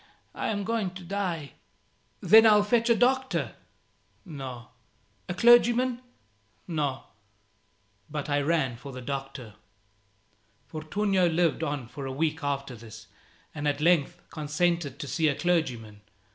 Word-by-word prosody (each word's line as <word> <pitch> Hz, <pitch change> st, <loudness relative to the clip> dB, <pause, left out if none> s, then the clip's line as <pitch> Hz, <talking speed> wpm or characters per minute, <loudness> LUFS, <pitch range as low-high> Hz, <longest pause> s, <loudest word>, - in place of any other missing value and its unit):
I -, -, -3 dB
am 205 Hz, -2 st, -1 dB
going 205 Hz, -4 st, -2 dB
to 185 Hz, -, -9 dB
die." 175 Hz, -5 st, -3 dB, 0.7 s
"Then 220 Hz, +1 st, +7 dB
I'll 210 Hz, -1 st, +6 dB
fetch 230 Hz, +2 st, +1 dB
a 235 Hz, -, +5 dB
doctor." 260 Hz, +3 st, +1 dB, 0.7 s
"No." 130 Hz, -, -8 dB, 0.6 s
"A 180 Hz, -, -2 dB
clergyman?" 240 Hz, +3 st, +4 dB, 0.7 s
"No." 145 Hz, -6 st, -2 dB, 1.1 s
But 150 Hz, -1 st, -4 dB
I 145 Hz, -1 st, +1 dB
ran 140 Hz, -5 st, 0 dB
for 140 Hz, +3 st, -9 dB
the 130 Hz, -1 st, -8 dB
doctor. 135 Hz, -4 st, -6 dB, 1.1 s
Fortunio 185 Hz, +4 st, 0 dB
lived 170 Hz, -1 st, +1 dB
on 145 Hz, -6 st, -3 dB
for 135 Hz, +3 st, -7 dB
a -, -, -4 dB
week 155 Hz, +2 st, -1 dB
after 140 Hz, -2 st, -3 dB
this, 110 Hz, -1 st, -12 dB, 0.5 s
and 150 Hz, -1 st, -3 dB
at 145 Hz, 0 st, 0 dB
length 170 Hz, +1 st, +2 dB
consented 155 Hz, -1 st, -1 dB
to 145 Hz, -, -6 dB
see 150 Hz, +4 st, +1 dB
a 145 Hz, -, +1 dB
clergyman. 125 Hz, -13 st, -1 dB
155 Hz, 130 wpm, -27 LUFS, 140-195 Hz, 1.1 s, Then